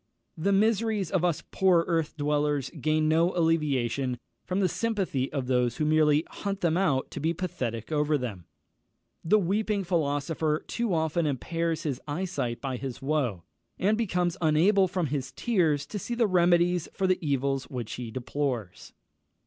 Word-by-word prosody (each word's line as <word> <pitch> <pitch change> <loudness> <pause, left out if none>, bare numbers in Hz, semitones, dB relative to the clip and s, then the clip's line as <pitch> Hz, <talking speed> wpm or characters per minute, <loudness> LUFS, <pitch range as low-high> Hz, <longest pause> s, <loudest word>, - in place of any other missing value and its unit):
The 185 +5 0
miseries 215 -2 +2
of 185 -3 +1
us 165 -2 0
poor 180 -3 +3
earth 165 -3 -1
dwellers 145 -1 0
gain 155 +1 0
no 165 +3 +2
alleviation 140 -6 +1 0.3
from 185 +1 0
the 190 - +3
sympathy 190 - -1
of 135 -3 -2
those 125 -2 +1
who 155 - 0
merely 155 0 +3
hunt 200 -1 -4
them 165 -2 +2
out 160 -8 +1
to - - -5
be 160 +3 0
pathetic 125 - -4
over 150 0 +2
them. 105 - -5 0.8
The 190 +6 +4
weeping 205 +2 0
philosopher 155 -2 0
too 235 -3 -2
often 160 0 0
impairs 165 +4 -2
his 140 -4 -3
eyesight 150 -7 -2
by 130 -2 -3
his 135 -1 -6
woe, 135 - -1 0.3
and 205 +4 +2
becomes 180 -6 0
unable 180 +5 +4
from 180 -1 -1
his 135 -2 -3
tears 165 - +1
to 205 +8 -5
see 240 +6 -4
the 235 -1 +3
remedies 175 -2 +3
for 195 - -1
the 185 -1 +1
evils 135 -2 0
which 120 -4 -5
he 120 -2 -5
deplores. 125 -4 -4
155 Hz, 160 wpm, -28 LUFS, 140-180 Hz, 0.8 s, The